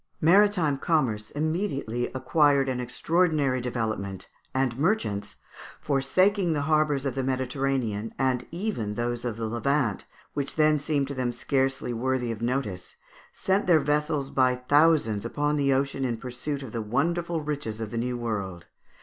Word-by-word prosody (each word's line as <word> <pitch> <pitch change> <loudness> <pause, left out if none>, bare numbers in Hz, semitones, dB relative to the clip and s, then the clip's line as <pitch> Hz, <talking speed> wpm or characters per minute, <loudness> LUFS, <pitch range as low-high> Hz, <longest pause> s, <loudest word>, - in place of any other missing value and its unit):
Maritime 175 -4 +4
commerce 130 -11 0
immediately 145 - -2
acquired 140 +1 +3
an 130 -1 -1
extraordinary 145 +1 +1
development, 110 -6 -3 0.2
and 130 -2 0
merchants, 145 - 0 0.4
forsaking 175 +7 +2
the 145 -2 -1
harbours 150 -2 +2
of 135 - -1
the 135 - -2
Mediterranean, 130 -4 -1
and 130 -2 0
even 170 - -3
those 120 +1 -2
of 120 -3 -3
the 115 - -3
Levant, 120 0 0 0.3
which 140 -1 -3
then 155 -1 +4
seemed 145 -1 0
to 140 - -4
them 130 -2 -1
scarcely 135 0 -1
worthy 125 0 -1
of 115 -1 -6
notice, 115 -7 -2 0.4
sent 190 +1 0
their 170 -3 +6
vessels 150 -1 0
by 130 -1 +3
thousands 145 -5 +3
upon 145 +5 0
the 140 -2 +2
ocean 135 0 0
in 120 -3 -1
pursuit 130 +4 -5
of 125 - -8
the 115 - -3
wonderful 165 +9 0
riches 145 -7 -4
of 110 -2 -5
the 115 - -4
New 125 +1 -2
World. 100 -7 -4
135 Hz, 150 wpm, -27 LUFS, 120-150 Hz, 0.4 s, their